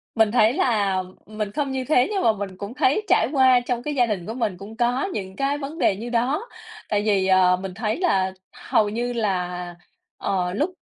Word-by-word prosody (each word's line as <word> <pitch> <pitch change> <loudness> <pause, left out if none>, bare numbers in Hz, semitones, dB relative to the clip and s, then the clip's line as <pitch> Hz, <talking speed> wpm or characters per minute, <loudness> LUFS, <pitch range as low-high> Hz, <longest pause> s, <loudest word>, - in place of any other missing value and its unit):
Mình 220 -2 +4
thấy 225 -2 +4
là 205 - +1 0.2
mình 215 -1 -4
không 280 +2 -2
như 260 -1 -2
thế 250 -2 +3
nhưng 400 -2 -1
mà 225 - +4
mình 195 -2 -6
cũng 200 +5 -7
thấy 290 +6 +2
trải 220 - +3
qua 260 -3 +5
trong 245 -1 -3
cái 295 +2 -3
gia 245 -3 +3
đình 195 -6 -3
của 225 - -5
mình 220 -7 -2
cũng 200 +4 -10
có 245 +3 +1
những 190 - -5
cái 275 +3 0
vấn 290 +3 -6
đề 195 - +2
như 235 +4 -6
đó. 265 - 0 0.4
Tại 205 -1 +1
vì, 200 -3 +2
ờ, 185 -1 +4
mình 185 0 -7
thấy 215 +2 -2
là 190 - +1 0.2
hầu 245 -3 0
như 240 +3 -2
là, 180 -5 -2 0.4
ờ, 180 -2 -1
lúc 300 - 0
220 Hz, 215 wpm, -23 LUFS, 195-255 Hz, 0.4 s, qua